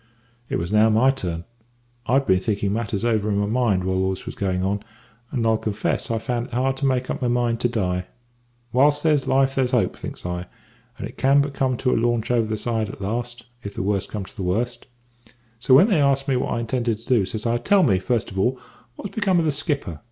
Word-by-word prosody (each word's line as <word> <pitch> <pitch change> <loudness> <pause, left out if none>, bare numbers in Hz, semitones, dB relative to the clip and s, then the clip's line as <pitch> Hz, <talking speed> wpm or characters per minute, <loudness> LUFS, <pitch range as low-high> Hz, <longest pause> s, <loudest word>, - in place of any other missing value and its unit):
"It - - -1
was 85 +3 -2
now 110 +1 +5
my 115 +5 +4
turn. 85 -10 -4 0.6
I'd 135 +2 +3
been 95 -5 +3
thinking 100 0 -1
matters 110 -1 -2
over 110 -3 +1
in 100 - +1
my 100 - +1
mind 110 -4 +1
whilst 95 0 0
all 95 - +1
this 95 0 -5
was - - -5
going 95 -2 -1
on; 100 +2 -1 0.5
and 120 -4 -1
I'll 110 -1 +2
confess 105 -2 -2
I 115 - 0
found 120 +1 -2
it 125 - -16
hard 130 +1 +1
to 140 0 0
make 130 -1 0
up - - -4
my 125 - +1
mind 120 -1 +1
to 120 - +1
die. 90 -5 -1 0.7
`Whilst 145 +3 +4
there's 150 -4 +2
life 135 0 +3
there's 130 -2 +1
hope,' 115 -7 +1
thinks - - -8
I; 90 0 -4 0.5
`and - - -5
it - - -14
can 135 +2 +4
but 140 0 0
come 130 -2 0
to 125 - 0
a - - +1
launch 120 -1 0
over 115 -2 +2
the 110 0 -2
side 110 -1 -1
at - - -9
last, 120 +3 -4 0.2
if 100 -2 -7
the - - -2
worst 100 -1 -1
comes 100 -3 -6
to - - -22
the - - -6
worst;' 115 +7 -2 0.7
so 130 +3 +5
when 175 +10 +7
they 190 -9 +3
asked 135 0 +2
me 135 - +2
what 125 - -1
I 115 - -1
intended 115 -1 -1
to 115 - -15
do, 120 -6 +3
says 105 +4 -4
I. 120 0 +1
`Tell 185 +6 +4
me, 95 -5 +3
first 115 +3 -1
of 95 - -4
all, 125 +6 +1 0.4
what's 200 - -7
become 195 -4 +2
of 165 - +2
the 155 - +2
skipper?' 140 - -2
115 Hz, 245 wpm, -23 LUFS, 100-130 Hz, 0.7 s, when